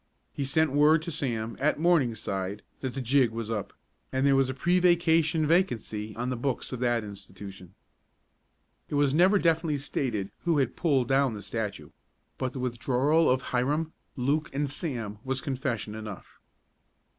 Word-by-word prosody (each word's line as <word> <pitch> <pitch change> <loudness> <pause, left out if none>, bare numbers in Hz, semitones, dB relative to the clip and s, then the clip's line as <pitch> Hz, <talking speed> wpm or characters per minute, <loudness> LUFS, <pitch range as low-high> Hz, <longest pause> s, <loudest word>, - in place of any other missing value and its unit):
He 140 - -2
sent 155 +2 +2
word 150 +3 +4
to 170 - -4
Sam, 115 -6 -2
at 150 +3 +2
Morningside, 110 - 0 0.2
that 130 -1 -4
"the 135 - -2
jig" 130 0 +3
was 115 0 -5
up, 105 -3 -3 0.4
and 130 +1 +1
there 140 -1 +5
was 135 -1 +3
a 130 - -3
pre 175 +6 +2
vacation 165 -3 +3
vacancy 115 - 0
on 125 +2 -2
the - - -1
books 125 +1 -2
of 130 - -4
that 120 -2 +1
institution. 100 -2 -10 1.1
It - - -2
was 145 -1 +3
never 185 +6 +5
definitely 165 -4 +2
stated 120 -7 -2
who 170 -3 +1
had 130 -4 +1
pulled 140 -8 +2
down 135 -3 +2
the 105 - -8
statue, 105 +1 -4 0.5
but 130 -1 -2
the 130 - -5
withdrawal 130 +6 +2
of 130 +1 +2
Hiram, 150 +6 0 0.2
Luke 145 +4 0
and 145 +1 0
Sam 120 - -4
was 135 0 -1
confession 125 -5 -3
enough. 110 -3 -9
130 Hz, 165 wpm, -28 LUFS, 115-150 Hz, 1.1 s, there